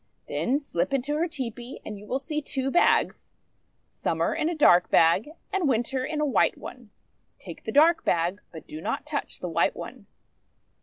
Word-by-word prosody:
Then 265 +3 0
slip 275 - -2
into 275 +3 -1
her 335 +3 +1
tepee, 250 -4 -6
and 210 - -6
you 210 - -13
will 260 - 0
see 300 +3 -3
two 270 -1 -2
bags 350 - +2 0.3
— - - -47 0.3
Summer - - -1
in 310 - 0
a 345 - -2
dark 180 - +5
bag, 165 - +4 0.2
and 370 -7 +1
Winter 255 +2 0
in 300 +3 -3
a 300 - +2
white 280 - +2
one. - - -10 0.5
Take - - -11
the - - -3
dark 320 +4 +5
bag, 175 +4 0
but 160 -3 -10
do 155 - -8
not - - -3
touch 300 -1 -5
the 180 - -3
white 170 0 +1
one." 235 -4 -9
265 Hz, 190 wpm, -26 LUFS, 205-300 Hz, 0.5 s, dark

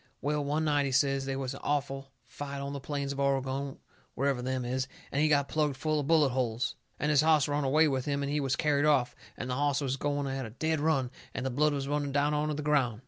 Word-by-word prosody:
Well, 150 +1 -1
one 150 +3 0
night 145 -2 +2
he - - -2
says, 135 +1 +2
they 135 0 -2
was 135 -1 -3
an - - -8
awful 135 -2 -2
fight 140 -1 -6
on 140 0 -4
the 140 - -4
plains 140 0 -3
of 140 - -5
Oregon, 135 0 0 0.4
wherever 135 -2 0
them 130 0 -2
is, 130 +2 -1 0.2
and 140 - +1
he 155 - +4
got 140 -2 +3
plugged 150 -3 0
full 155 +2 0
of 140 - -3
bullet 155 -3 +5
holes. 125 -2 -1 0.2
And 150 - +1
his 145 -1 +5
hoss 155 -2 +4
run 145 0 0
away 155 +4 +4
with 130 -3 -1
him 140 -1 -1
and 140 - -2
he 150 - +1
was 135 -2 0
carried 150 -2 +2
off, 130 -5 +3 0.2
and 125 - -4
the 125 - -2
hoss 145 0 +1
was 135 -2 -1
going 145 0 -1
at 135 0 -3
a 115 - -6
dead 160 +7 -1
run, 140 -5 +1 0.2
and 130 - -3
the 130 - -1
blood 150 +4 +2
was 140 -1 -2
running 145 -1 -1
down 145 +1 +2
onto 150 0 0
the 150 - -4
ground. 135 -7 +2
140 Hz, 255 wpm, -30 LUFS, 135-150 Hz, 0.4 s, bullet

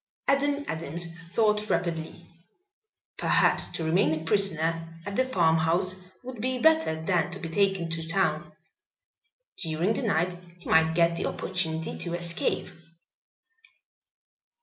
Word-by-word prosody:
Adam 285 +1 +1
Adams 165 +1 -3 0.2
thought 210 -1 +1
rapidly. 170 0 -2 0.9
Perhaps - - +3
to 165 - -4
remain 160 -1 +2
a - - -9
prisoner 165 -3 +1
at 200 - -5
the 260 - +3
farmhouse 170 -4 +2 0.3
would 245 -3 -8
be 255 +1 -1
better 315 - +3
than 175 -1 +1
to 180 - -6
be 180 - -6
taken 195 0 +1
to 165 0 -4
town. 190 +4 0 1.1
During 165 +4 0
the 225 - -3
night 180 -6 0 0.2
he 175 - -14
might 160 0 +3
get 170 0 +3
the - - -1
opportunity 160 -3 -2
to 170 -1 -3
escape. 170 0 0
175 Hz, 125 wpm, -27 LUFS, 165-200 Hz, 1.1 s, Perhaps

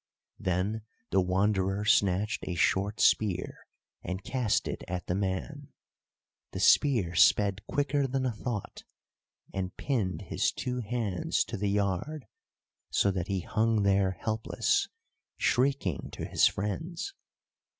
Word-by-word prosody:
Then 95 +5 -1 0.3
the 95 - +4
Wanderer 95 +2 +1
snatched 100 0 +2
a 90 - -2
short 100 +4 +1
spear 95 -4 +1 0.3
and 95 +2 -5
cast 125 -5 0
it - - -4
at 90 0 -4
the - - -1
man. 100 +10 -3 0.9
The - - -4
spear 115 -12 +4
sped 100 +4 +4
quicker 145 -1 +1
than 130 0 -1
a 125 - +1
thought, 110 -1 -5 0.7
and 95 -1 -4
pinned 105 - -1
his - - 0
two 125 0 -3
hands 110 -5 -1
to - - -6
the 100 +1 -1
yard 105 - -1 0.6
so 100 - +2
that 90 -1 -3
he 95 -2 -1
hung 110 +3 +1
there 95 -2 +2
helpless, 110 0 0 0.5
shrieking 125 - +1
to - - -5
his - - +4
friends. 160 - -3
100 Hz, 130 wpm, -29 LUFS, 95-120 Hz, 0.9 s, the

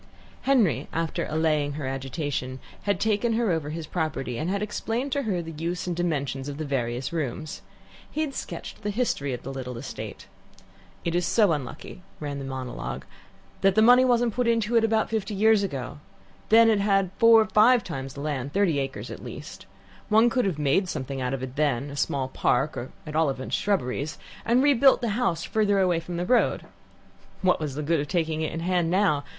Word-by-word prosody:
Henry, 200 - +2
after 165 0 -2
allaying 155 -2 +1
her 145 -1 -5
agitation, 135 0 -3 0.3
had 200 -3 +1
taken 220 +2 +1
her 225 -3 +1
over 160 -3 -1
his 160 +1 -5
property, 150 -7 -3
and 160 - -2
had 200 +2 -1
explained 230 +5 -3
to 285 - +1
her 190 -8 -1
the 165 - -7
use 165 +3 -3
and 175 -1 -2
dimensions 140 -6 -2
of 140 - -6
the 155 - -3
various 125 0 -2
rooms. 155 -1 -4 0.5
He 310 - -3
had 300 -3 -2
sketched - - -7
the 210 - -2
history 200 - -1
of 125 - -5
the 135 - -5
little 125 -2 -5
estate. 130 +3 -7 0.8
"It 170 - 0
is 175 -1 +1
so 200 +1 +4
unlucky," 150 +4 -5 0.2
ran 145 -2 -4
the 135 - -5
monologue, 125 - -5 0.6
"that 195 0 +3
money 245 +2 +7
wasn't 240 -2 +2
put 250 -1 0
into 230 0 +1
it 230 - +5
about 220 -1 +1
fifty 215 -2 -2
years 220 +1 +4
ago. 145 -6 -4 0.5
Then 225 +1 +7
it 220 -2 +4
had 195 -2 +2
four 230 -2 +7
five 220 +2 +5
times 135 -5 -6
the 140 - -6
land 140 -2 -3
thirty 190 -7 +2
acres 135 -1 -4
at - - -8
least. - - -9 0.4
One 220 +2 +5
could 250 -2 +1
have 185 -6 -1
made 150 +6 +1
something 135 -2 -4
out 125 +1 -1
of 130 - -6
it 130 0 -6
then 145 -2 0
a - - -7
small 140 -2 -1
park, 150 +3 0
or 125 - -5 0.2
at 155 -1 -7
all 160 -2 +3
events 130 -1 -3
shrubberies, 150 -7 -1 0.3
and 245 +3 +4
rebuilt 275 -2 +5
the 235 - 0
house 200 -7 0
farther 210 -2 +1
away 180 -3 +2
from 170 +1 -6
the 175 - -1
road. 245 +4 +2 0.8
What's 155 -6 +1
the 150 - -3
good 165 +2 +1
of 145 - -2
taking 160 -2 -1
it 155 - -1
in 165 - -4
hand 175 -1 +1
now? 180 -6 +2
165 Hz, 200 wpm, -26 LUFS, 140-215 Hz, 0.8 s, money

